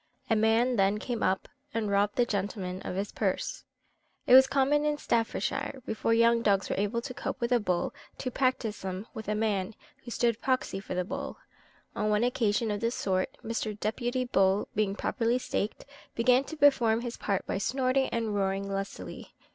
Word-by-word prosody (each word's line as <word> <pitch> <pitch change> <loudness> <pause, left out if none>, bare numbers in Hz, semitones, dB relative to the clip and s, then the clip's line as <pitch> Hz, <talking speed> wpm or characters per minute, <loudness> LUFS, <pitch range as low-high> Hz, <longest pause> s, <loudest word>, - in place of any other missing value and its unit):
A - - +5
man 225 +3 +3
then 195 +1 +3
came 235 +1 -4
up, 190 0 +1 0.3
and 215 -3 0
robbed 200 +1 +2
the 245 - +3
gentleman 195 -3 -3
of - - -5
his 200 +1 -2
purse. - - -2 0.6
It - - +4
was 265 +1 +9
common 275 +2 +2
in 300 0 +1
Staffordshire, 265 +3 -1
before 220 +1 -1
young 230 0 +4
dogs 200 -3 +2
were - - -1
able 205 +3 0
to 255 - -5
cope 255 - -4
with 235 0 -1
a 245 - +5
bull, 180 -5 -1 0.2
to 255 - -3
practise 255 -5 0
them 190 +2 -4
with 220 - -7
a 210 - 0
man, 210 -1 -1 0.3
who 240 - -9
stood 235 -1 0
proxy 255 -6 0
for 195 - -6
the 180 0 0
bull. - - -5 0.6
On 215 - 0
one 210 +2 +2
occasion 230 -3 +1
of 205 - -2
this 230 +1 0
sort, 185 -1 -1
Mr. 220 -2 -3
Deputy 240 +4 -1
Bull 195 -3 +2
being 205 -2 0
properly 235 +2 0
staked, 215 -4 -3 0.3
began 250 +3 +4
to 320 - -8
perform 240 -6 +4
his 240 -1 -4
part 200 -2 -1
by - - -2
snorting 260 +4 +1
and 225 -2 -1
roaring 195 0 0
lustily. 195 0 -6
225 Hz, 185 wpm, -29 LUFS, 200-245 Hz, 0.6 s, was